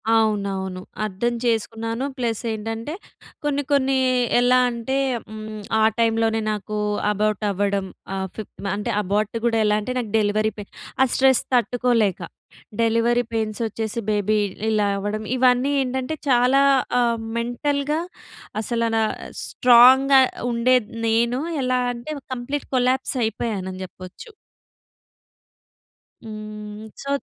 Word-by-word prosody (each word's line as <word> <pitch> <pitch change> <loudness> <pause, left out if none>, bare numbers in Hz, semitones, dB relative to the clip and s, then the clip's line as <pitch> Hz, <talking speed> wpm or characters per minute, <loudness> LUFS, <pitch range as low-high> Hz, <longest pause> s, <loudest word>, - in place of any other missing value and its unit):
అవునవును. 200 -4 0 0.2
అర్థం 215 +4 -1
చేసుకున్నాను 225 +2 -1
ప్లస్ 230 -3 -1
ఏంటంటే 225 +5 -4 0.5
కొన్ని 290 -1 0
కొన్ని 270 -1 +3 0.4
ఎలా 250 +1 +4
అంటే 235 +3 -2 0.3
హ్మ్, 215 0 -7 0.2
ఆ - - +3 0.2
టైమ్ 225 -1 +3
లోనే 225 0 +1
నాకు 210 0 -4 0.3
అబార్ట్ 210 0 0
అవ్వడం. 200 0 0 0.3
ఆ - - -2 0.2
ఫిఫ్ 220 - -7 0.2
అంటే 205 - -3
అబార్ట్ 205 +3 -1
కూడా 225 -1 +2
ఎలా 210 0 +3
అంటే, 250 +4 -4
నాకు 225 -4 -5
డెలివరీ 215 +1 +1
పెయిన్ 205 - -9 0.3
ఆ - - +5
స్ట్రెస్ 265 -1 +4
తట్టుకోలేక. 240 -5 +2 0.6
డెలివరీ 230 +2 +2
పెయిన్స్ 215 -2 -2
వచ్చేసి, 220 +2 -4
బేబీ 210 0 +1 0.3
ఇలా 210 -2 +2
అవ్వడం. 205 +2 -3
ఇవన్నీ 255 +2 +3
ఏంటంటే 260 +3 -2
చాలా 250 +2 +4 0.4
ఆహ్, 235 -1 +2 0.2
మెంటల్‌గా 280 +5 -1 0.6
అసల 230 +1 -1
నా 225 - +3 0.4
స్ట్రాంగ్‌గా 260 +2 +6 0.3
ఉండేది 235 -1 +2 0.2
నేను. 235 +3 +2 0.2
ఎలా 255 0 +1
అంటే 245 +6 -6 0.2
కంప్లీట్ 260 +4 -4
కొలాప్స్ 255 +2 +1
అయిపోయానని 195 -5 -3
చెప్పొచ్చు. 185 - -12 1.9
హ్మ్. 215 0 -8
సో 280 0 -1
230 Hz, 115 wpm, -22 LUFS, 210-250 Hz, 1.9 s, స్ట్రాంగ్‌గా